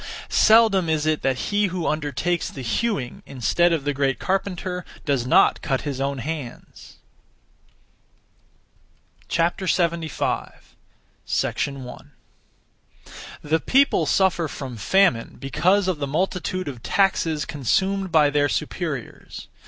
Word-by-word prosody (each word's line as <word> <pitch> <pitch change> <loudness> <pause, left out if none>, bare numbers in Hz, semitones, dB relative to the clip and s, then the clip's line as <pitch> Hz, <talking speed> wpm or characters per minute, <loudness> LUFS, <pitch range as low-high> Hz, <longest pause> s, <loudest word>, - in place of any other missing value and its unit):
Seldom 215 -6 +5
is 155 -1 0
it 155 -1 +1
that 135 -1 0
he 205 0 +2
who 180 -2 -4
undertakes 155 +3 -1
the 135 - -8
hewing, 135 - -2
instead 140 +7 +1
of 160 -4 0
the 145 0 -1
great 135 -1 0
carpenter, 185 -1 -2 0.2
does 135 -4 0
not - - +4
cut 135 -3 -1
his 140 -3 -4
own 140 0 -1
hands! 140 -2 -7 2.3
75. 170 -1 -1 0.5
1. 130 -3 -3 1.3
The 155 +2 +1
people 275 - +3
suffer 185 -4 +2
from 135 -4 -7
famine 120 - +2
because 180 +9 +1
of 180 -5 -1
the 140 - -2
multitude 185 +3 -2
of 130 -5 -6
taxes 165 -5 +1
consumed 190 - 0
by 150 -3 +4
their 145 0 +2
superiors. 150 - -5
160 Hz, 115 wpm, -23 LUFS, 140-185 Hz, 2.3 s, Seldom